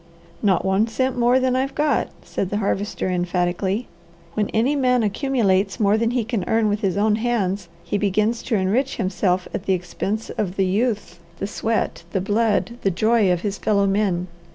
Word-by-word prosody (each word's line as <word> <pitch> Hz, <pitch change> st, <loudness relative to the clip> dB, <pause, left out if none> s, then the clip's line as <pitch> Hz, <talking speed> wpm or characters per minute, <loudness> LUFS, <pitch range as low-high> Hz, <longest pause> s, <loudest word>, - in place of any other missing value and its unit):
"Not 195 Hz, -4 st, +2 dB
one 190 Hz, +3 st, +2 dB
cent 260 Hz, +3 st, -1 dB
more 245 Hz, +1 st, +3 dB
than 255 Hz, -1 st, +1 dB
I've 265 Hz, +1 st, -1 dB
got," 300 Hz, 0 st, +1 dB, 0.2 s
said 190 Hz, -, -3 dB
the 205 Hz, -, -1 dB
Harvester 205 Hz, 0 st, -1 dB
emphatically. 180 Hz, +4 st, -1 dB, 0.5 s
"When 210 Hz, +1 st, 0 dB
any 245 Hz, +7 st, +1 dB
man 250 Hz, -3 st, +2 dB
accumulates 205 Hz, -4 st, +1 dB
more 205 Hz, -1 st, +4 dB
than 230 Hz, +1 st, +1 dB
he 245 Hz, -1 st, 0 dB
can 225 Hz, -5 st, -2 dB
earn 220 Hz, -1 st, +2 dB
with 205 Hz, 0 st, 0 dB
his 195 Hz, -3 st, 0 dB
own 210 Hz, +1 st, +3 dB
hands, 200 Hz, -6 st, -1 dB
he 205 Hz, -, -2 dB
begins 210 Hz, +3 st, +1 dB
to 235 Hz, -, 0 dB
enrich 215 Hz, +8 st, +1 dB
himself 185 Hz, -1 st, 0 dB
at 195 Hz, -, -4 dB
the 190 Hz, -, +3 dB
expense 190 Hz, +4 st, -3 dB
of 190 Hz, -3 st, -3 dB
the 195 Hz, -, +2 dB
youth, 205 Hz, -3 st, -1 dB, 0.2 s
the 195 Hz, -, -3 dB
sweat, 220 Hz, 0 st, -1 dB
the 190 Hz, -, +1 dB
blood, 225 Hz, +3 st, 0 dB
the 195 Hz, -, +2 dB
joy 215 Hz, +1 st, +3 dB
of 175 Hz, -1 st, 0 dB
his 205 Hz, -1 st, -3 dB
fellow 200 Hz, -2 st, +2 dB
men. 195 Hz, -3 st, +1 dB
210 Hz, 185 wpm, -22 LUFS, 190-230 Hz, 0.5 s, more